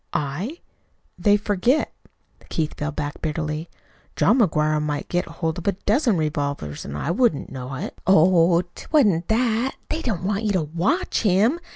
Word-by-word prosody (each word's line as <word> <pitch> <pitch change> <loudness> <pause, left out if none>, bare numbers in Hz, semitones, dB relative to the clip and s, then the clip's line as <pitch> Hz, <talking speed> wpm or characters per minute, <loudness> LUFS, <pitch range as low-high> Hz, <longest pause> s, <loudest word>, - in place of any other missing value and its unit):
"I? 175 - -3 0.6
They 205 +3 +4
forget." 210 +8 +1 0.6
Keith 155 -2 -1
fell 150 +1 -3
back 145 0 -5
bitterly. 155 0 -3 0.5
"John 260 - +3
McGuire 155 -7 +2
might 150 -1 -3
get 175 0 0
hold 165 0 -3
of 175 - -8
a 200 - +3
dozen 215 - +1
revolvers, 145 - -2
and 70 - -6
I 150 - -1
wouldn't 195 - +1
know 130 0 -6
it." - - -6
"Oh, 175 -1 +5
'twa'n't 205 - +2
that. 235 +2 +1
They 320 - -2
didn't 210 - -2
want 200 +2 0
you 205 - +1
to 180 -4 +1
WATCH 170 - 0
him. 215 - +3
175 Hz, 160 wpm, -23 LUFS, 150-215 Hz, 0.6 s, Oh